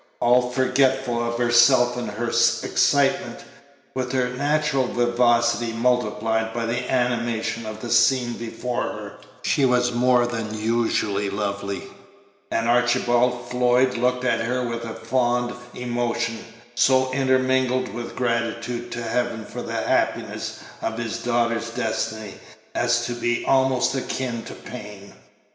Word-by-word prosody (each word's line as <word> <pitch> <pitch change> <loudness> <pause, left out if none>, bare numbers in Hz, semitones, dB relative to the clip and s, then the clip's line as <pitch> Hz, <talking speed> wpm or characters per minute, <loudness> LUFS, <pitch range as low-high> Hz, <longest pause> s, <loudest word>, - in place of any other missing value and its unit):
All 125 +1 +3
forgetful 130 -1 +1
of 120 0 -2
herself 120 +1 +5
in 120 -2 -4
her 110 +3 -4
excitement, - - +2 0.5
with 130 -1 -3
her 125 -1 +1
natural 145 0 0
vivacity 120 -1 +2
multiplied 115 -2 0
by 115 -1 -1
the 125 +2 -2
animation 115 -3 -1
of 110 0 -7
the 120 - -5
scene 120 +1 +3
before 120 +1 -4
her, - - -5 0.3
she 140 - +1
was 125 -1 +3
more 125 0 +3
than 115 -3 -4
usually 110 -3 0
lovely; 100 -1 -3 0.7
and 115 0 0
Archibald 120 0 +2
Floyd 125 +1 +3
looked 125 +1 0
at 125 - +1
her 125 +2 -1
with 115 0 -4
a 115 - -6
fond 120 -1 0 0.2
emotion, 120 -1 -2 0.3
so 130 +1 +3
intermingled 130 -1 +2
with 120 +3 -7
gratitude 120 0 -2
to 120 - -4
Heaven 115 -1 -2
for - - -7
the - - -6
happiness - - -1 0.2
of 115 0 -3
his 115 -1 -3
daughter's 115 -1 0
destiny 110 -2 -3 0.4
as 120 0 +1
to 120 - -3
be 120 0 -1
almost 130 -2 +2
akin 130 -3 -3
to - - -8
pain. 105 - -10
120 Hz, 130 wpm, -23 LUFS, 115-125 Hz, 0.7 s, herself